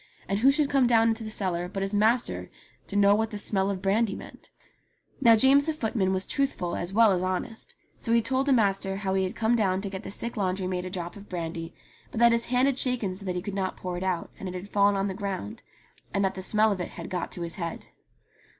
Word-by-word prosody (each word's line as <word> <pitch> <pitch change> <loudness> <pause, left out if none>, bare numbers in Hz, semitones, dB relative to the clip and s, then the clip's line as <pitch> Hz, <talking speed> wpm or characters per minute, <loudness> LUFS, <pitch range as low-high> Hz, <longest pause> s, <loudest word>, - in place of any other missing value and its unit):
And 195 +1 0
who 265 +5 +6
should 295 +1 +2
come 270 -3 +4
down 230 -1 +4
into 225 0 -2
the 215 - -5
cellar 180 -4 -2
but 195 +1 -3
his 195 +1 -3
master 220 +4 +1 0.4
to 205 - -7
know 200 0 +5
what 220 +1 +1
the 210 - -5
smell 195 -1 +1
of 195 -2 -4
brandy 200 +1 +1
meant! - - -12 0.7
Now 230 -3 +7
James 270 +5 +5
the 315 - 0
footman 220 -9 -1
was 190 0 -1
truthful 270 -11 -1
as 175 +1 -4
well 220 +1 +5
as 180 -2 +1
honest, 185 +5 -4 0.2
so 230 - -2
he 235 - +5
told 260 +4 0
the - - +3
master 195 -5 +2
how 195 -1 -2
he 190 0 +1
had 185 - -5
come 230 +1 +2
down 190 -5 +1
to 200 - -4
get 190 -1 -5
the - - -8
sick 230 +3 -3
laundry 190 -1 -1
maid 180 0 -2
a - - -4
drop 175 -2 -5
of 200 0 -13
brandy, 165 -1 -5 0.3
but - - -5
that 235 0 +6
his 235 0 +1
hand 250 +2 +3
had 275 -1 0
shaken 235 -8 0
so 195 +1 -6
that 180 - -2
he 180 - -3
could 205 -1 -5
not 190 -1 -2
pour 180 -1 -4
it 175 - -4
out, 185 -3 -2
and 190 - -5
it 180 - -7
had 180 +2 -6
fallen 200 0 +3
on 195 0 0
the 195 - -2
ground, 190 - -5 0.5
and 200 0 +2
that 190 - 0
the 190 - -6
smell 215 +3 +3
of 190 -3 -2
it - - -3
had 170 - -8
got 180 -2 -4
to 175 - -2
his 170 -1 -1
head. 170 -3 -5
200 Hz, 260 wpm, -27 LUFS, 185-230 Hz, 0.7 s, Now